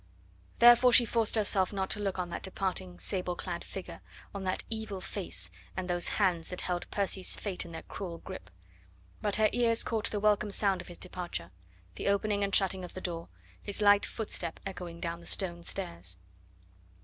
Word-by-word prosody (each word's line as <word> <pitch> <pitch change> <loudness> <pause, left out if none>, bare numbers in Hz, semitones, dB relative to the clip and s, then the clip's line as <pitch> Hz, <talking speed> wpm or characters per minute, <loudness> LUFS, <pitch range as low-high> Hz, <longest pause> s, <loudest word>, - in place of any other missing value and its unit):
Therefore 240 +1 +8
she 240 0 +9
forced 225 -1 +1
herself 200 -3 +3
not 190 -2 -2
to 210 - +2
look 195 -2 -1
on 180 -1 -2
that - - -4
departing, 185 - -2
sable 180 - -1
clad 175 -1 -4
figure, 190 - -8 0.3
on 200 - -4
that 185 - -1
evil 220 -3 -4
face, 185 0 -4 0.3
and 185 -1 -2
those 175 -1 +1
hands 180 -5 +2
that 180 - -5
held 175 -1 -2
Percy's 195 -2 +1
fate 195 -4 -3
in - - -10
their 160 -1 -7
cruel 175 -4 -6
grip; 185 +2 -9 0.7
but 205 -2 +2
her 215 0 +5
ears 230 -2 +3
caught 220 -2 +1
the 210 - -2
welcome 210 0 +3
sound 195 -2 +2
of 180 - -13
his 175 - -6
departure 175 - -5 0.4
the 90 - -4
opening 200 0 +2
and 200 -1 +2
shutting 190 -1 +3
of 180 - -8
the - - -4
door, 170 -2 -4 0.3
his 205 0 -4
light 205 -1 +6
footstep 180 -7 -4
echoing 180 -3 -6
down 170 -1 -3
the 170 - -8
stone 175 -3 -2
stairs. 85 - -3
190 Hz, 185 wpm, -31 LUFS, 175-205 Hz, 0.7 s, she